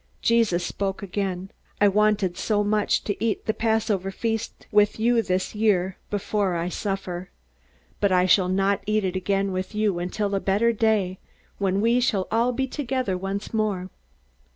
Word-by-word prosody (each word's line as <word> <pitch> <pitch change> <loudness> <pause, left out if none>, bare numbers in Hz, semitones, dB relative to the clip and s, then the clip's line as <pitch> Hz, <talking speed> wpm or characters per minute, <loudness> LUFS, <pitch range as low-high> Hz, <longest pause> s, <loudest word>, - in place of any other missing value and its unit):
Jesus 220 -7 +2
spoke 195 0 -3
again: 190 -1 -3 0.3
"I 205 - +6
wanted 205 -2 +2
so 210 +1 0
much 210 0 +1
to 205 +1 -3
eat 225 -2 -1
the 220 - +1
Passover 220 -4 0
feast 225 +2 -3
with 210 0 +3
you 235 +1 +3
this 185 -3 -1
year, 195 -4 +1
before 205 -2 -1
I 170 +1 -1
suffer. 190 -2 -4 0.7
But 200 -2 +2
I 180 0 +4
shall 185 0 +4
not 195 +1 +1
eat 215 -1 +1
it 185 0 -2
again 195 +1 0
with 185 +3 -4
you 210 -4 +1
until 200 +3 -2
a 195 - +2
better 210 +5 +2
day, 210 -4 +1 0.4
when 195 0 +1
we 235 +2 +3
shall 210 -7 +1
all 230 +3 +2
be 265 +2 -1
together 255 -7 -2
once 195 +4 -4
more." 205 -4 -1
200 Hz, 165 wpm, -24 LUFS, 185-220 Hz, 0.7 s, I